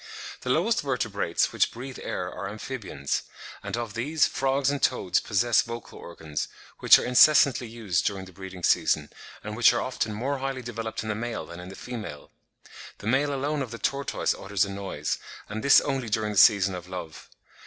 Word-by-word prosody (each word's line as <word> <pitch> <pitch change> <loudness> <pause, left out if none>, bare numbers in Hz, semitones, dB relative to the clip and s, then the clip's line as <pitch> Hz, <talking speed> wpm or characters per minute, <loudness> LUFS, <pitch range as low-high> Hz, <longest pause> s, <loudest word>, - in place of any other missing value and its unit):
The 125 - -5
lowest 180 - +2
Vertebrates 110 -10 0
which - - +3
breathe 130 +2 -8
air 90 - -3
are 100 +1 -5
Amphibians; 105 - -4 0.4
and - - -4
of 115 -4 -4
these, 145 +7 +2
frogs 135 +1 +1
and 145 - -3
toads 95 -8 +2
possess 115 +3 +2
vocal 115 -1 -8
organs, 80 -3 -5 0.3
which - - +8
are - - -2
incessantly 130 -1 +5
used 110 -5 -1
during 95 -2 -3
the 95 - -13
breeding 95 0 -10
season, 75 -2 +2 0.3
and 105 0 -5
which 120 +1 +6
are 120 - 0
often 125 -4 -2
more 130 +6 -2
highly 135 -1 -3
developed 115 -2 -4
in 110 - -5
the - - +1
male 115 +2 -4
than 85 - -10
in 90 +1 -8
the 95 - -9
female. 110 -11 -7 0.7
The - - -12
male 135 +6 +2
alone 145 +2 -1
of 130 - -3
the 115 - -7
tortoise 140 +3 -1
utters 100 0 0
a 100 - -6
noise, 95 -7 -3 0.3
and 110 +2 -5
this 140 - +8
only 135 -5 -2
during 105 0 0
the 105 - -4
season 100 -3 +6
of 90 -1 -7
love. 85 -4 -8
115 Hz, 190 wpm, -26 LUFS, 95-130 Hz, 0.7 s, which